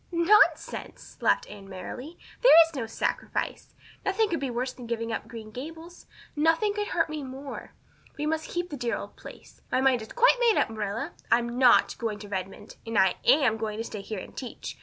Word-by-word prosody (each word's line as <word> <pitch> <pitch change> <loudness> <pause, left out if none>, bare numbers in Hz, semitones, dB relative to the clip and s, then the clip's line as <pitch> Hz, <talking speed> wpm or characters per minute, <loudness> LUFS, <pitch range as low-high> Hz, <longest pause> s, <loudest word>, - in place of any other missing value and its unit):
"Nonsense!" 345 +5 +2
Anne - - -11
laughed - - +3
merrily. 205 - -8 0.2
"There - - +7 0.2
is 325 - -14
no 245 -5 -3
sacrifice. 225 - -3 0.3
Nothing 415 +2 +1
could 335 - -1
be 275 - -2
worse 250 +2 -2
than 245 -2 -10
giving 230 0 -2
up 225 - -4
Green 220 -2 -9
Gables 320 +8 -9 0.3
nothing 325 +7 +2
could 415 0 -2
hurt 330 - +1
me 310 -1 -5
more. 270 +1 -8 0.4
We 295 - -2
must 315 +1 -1
keep 350 0 -3
the 290 - -4
dear 240 -2 -1
old - - -8
place. - - -13
My - - +2
mind 260 -3 +3
is 220 - -10
quite - - +5
made 470 -3 +4
up, - - +2
Marilla. 215 +8 -3 0.2
I'm 235 +1 +2
not 250 -2 +5
going 225 -3 -2
to 205 0 -10
Redmond; 190 -1 -6
and 225 -1 -3
I 190 -2 +4
am 255 -7 +4
going 215 -1 -3
to 225 - -2
stay 215 -3 -6
here 210 +1 -6
and - - -9
teach. 250 -3 -7
255 Hz, 200 wpm, -27 LUFS, 225-325 Hz, 0.4 s, There